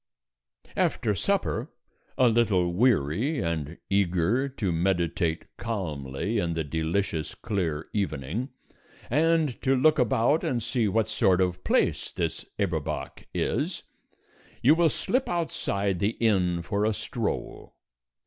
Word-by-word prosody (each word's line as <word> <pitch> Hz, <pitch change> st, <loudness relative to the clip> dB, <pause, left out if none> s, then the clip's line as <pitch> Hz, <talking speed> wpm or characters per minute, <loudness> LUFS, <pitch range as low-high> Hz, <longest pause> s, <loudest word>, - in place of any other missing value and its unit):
After 110 Hz, -3 st, +1 dB
supper, 150 Hz, -, 0 dB, 0.5 s
a 130 Hz, -2 st, +5 dB
little 105 Hz, -7 st, +2 dB
weary 110 Hz, -, +2 dB
and 85 Hz, -2 st, -2 dB
eager 100 Hz, +7 st, +1 dB
to 105 Hz, -8 st, -2 dB
meditate 85 Hz, -1 st, 0 dB
calmly 90 Hz, -, -3 dB
in 85 Hz, -4 st, -1 dB
the 80 Hz, -, -1 dB
delicious 80 Hz, +2 st, -2 dB
clear 80 Hz, -7 st, -2 dB
evening, 95 Hz, -, -2 dB, 0.6 s
and 160 Hz, -1 st, +2 dB
to 135 Hz, 0 st, +3 dB
look 150 Hz, +4 st, +4 dB
about 125 Hz, +5 st, +3 dB
and 120 Hz, -3 st, -1 dB
see 120 Hz, -3 st, +1 dB
what 110 Hz, +2 st, +1 dB
sort 100 Hz, -4 st, +2 dB
of 90 Hz, -1 st, 0 dB
place -, -, +1 dB
this -, -, -3 dB
Eberbach 85 Hz, -7 st, -3 dB
is, -, -, -1 dB, 0.8 s
you 135 Hz, +6 st, +7 dB
will 165 Hz, 0 st, +4 dB
slip 255 Hz, -, -1 dB
outside 100 Hz, -, -1 dB
the 105 Hz, +4 st, 0 dB
inn 90 Hz, -6 st, +2 dB
for 100 Hz, +3 st, -1 dB
a 110 Hz, 0 st, +1 dB
stroll. -, -, -4 dB
100 Hz, 120 wpm, -27 LUFS, 85-120 Hz, 0.8 s, you